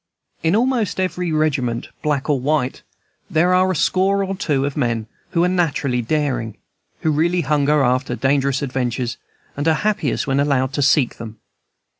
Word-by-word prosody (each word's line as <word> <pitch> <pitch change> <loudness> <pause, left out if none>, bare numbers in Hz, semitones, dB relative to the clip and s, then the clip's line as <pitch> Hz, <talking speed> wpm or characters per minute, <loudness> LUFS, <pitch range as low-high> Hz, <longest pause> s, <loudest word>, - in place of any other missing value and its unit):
In 165 +3 +2
almost 235 -4 +1
every 180 -2 -1
regiment, 140 -7 0
black 145 -3 -1
or 145 -3 +2
white, 135 -1 -1 0.5
there 170 +3 +3
are 185 +1 +3
a - - -1
score 195 +5 +2
or 195 0 -3
two 150 -8 0
of 140 - -3
men 120 -5 -1 0.2
who 170 - +1
are - - +3
naturally 150 -8 0
daring, 120 -4 -1 0.4
who 160 - +1
really 170 +4 +1
hunger 150 0 +2
after 125 0 +1
dangerous 140 +1 +1
adventures, 125 -2 -2 0.4
and 145 +3 -2
are 160 - +4
happiest 200 - 0
when 135 0 0
allowed 140 -2 +1
to 145 - -1
seek 140 -2 +3
them. 110 -1 -8
145 Hz, 165 wpm, -20 LUFS, 130-170 Hz, 0.5 s, are